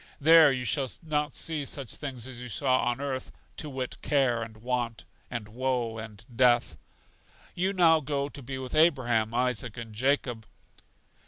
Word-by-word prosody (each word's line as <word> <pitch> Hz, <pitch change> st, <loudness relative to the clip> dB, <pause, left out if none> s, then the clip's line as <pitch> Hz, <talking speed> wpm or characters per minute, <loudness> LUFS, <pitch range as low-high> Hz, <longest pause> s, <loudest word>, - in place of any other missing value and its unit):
There 160 Hz, 0 st, +7 dB
you 125 Hz, -1 st, -2 dB
shall 130 Hz, +3 st, 0 dB
not 150 Hz, -1 st, -1 dB
see 155 Hz, -3 st, -1 dB
such 135 Hz, -2 st, -4 dB
things 130 Hz, -5 st, -6 dB
as 130 Hz, -2 st, -8 dB
you 125 Hz, 0 st, -7 dB
saw 130 Hz, +3 st, +1 dB
on 120 Hz, +1 st, 0 dB
earth, 135 Hz, -2 st, -4 dB, 0.3 s
to 150 Hz, -, -4 dB
wit, 130 Hz, -2 st, -4 dB
care 130 Hz, -5 st, +2 dB
and 110 Hz, -1 st, -7 dB
want, 120 Hz, 0 st, -3 dB, 0.2 s
and 120 Hz, -4 st, -5 dB
woe 120 Hz, -1 st, -2 dB
and 110 Hz, 0 st, -10 dB
death. 120 Hz, -1 st, +3 dB, 0.8 s
You 185 Hz, +2 st, 0 dB
now 170 Hz, -4 st, +5 dB
go 140 Hz, -1 st, -2 dB
to 145 Hz, 0 st, -10 dB
be 130 Hz, +1 st, -6 dB
with 130 Hz, -1 st, -6 dB
Abraham, 125 Hz, -9 st, +3 dB
Isaac, 125 Hz, -2 st, -1 dB
and 115 Hz, -2 st, -7 dB
Jacob. 120 Hz, -1 st, 0 dB
130 Hz, 165 wpm, -28 LUFS, 120-140 Hz, 0.8 s, There